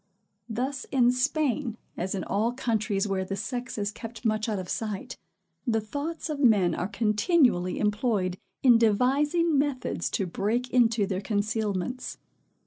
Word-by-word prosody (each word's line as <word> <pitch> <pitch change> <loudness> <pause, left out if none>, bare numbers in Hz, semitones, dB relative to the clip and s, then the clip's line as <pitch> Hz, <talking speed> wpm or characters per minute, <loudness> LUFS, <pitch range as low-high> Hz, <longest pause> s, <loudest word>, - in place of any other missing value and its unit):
Thus 255 +5 -2
in 245 -2 +3
Spain, 255 -2 0 0.2
as 190 +3 -2
in 190 - -3
all 220 +4 0
countries 215 -5 0
where 195 -1 0
the 195 +1 -4
sex 245 +5 -4
is 205 -1 -1
kept 225 +2 -9
much 215 0 +1
out 210 - -1
of 185 -1 -5
sight, 210 0 -4 0.5
the 225 -2 +2
thoughts 290 +11 -4
of 300 -3 -3
men 205 - +4
are 175 - -2
continually 210 - +2
employed 210 -4 0 0.2
in 245 -3 +7
devising 280 +8 +3
methods 280 -3 -1
to 200 - -1
break 215 +8 -1
into 230 -4 +3
their 190 -1 -2
concealments. 210 +2 -2
225 Hz, 145 wpm, -27 LUFS, 205-255 Hz, 0.5 s, in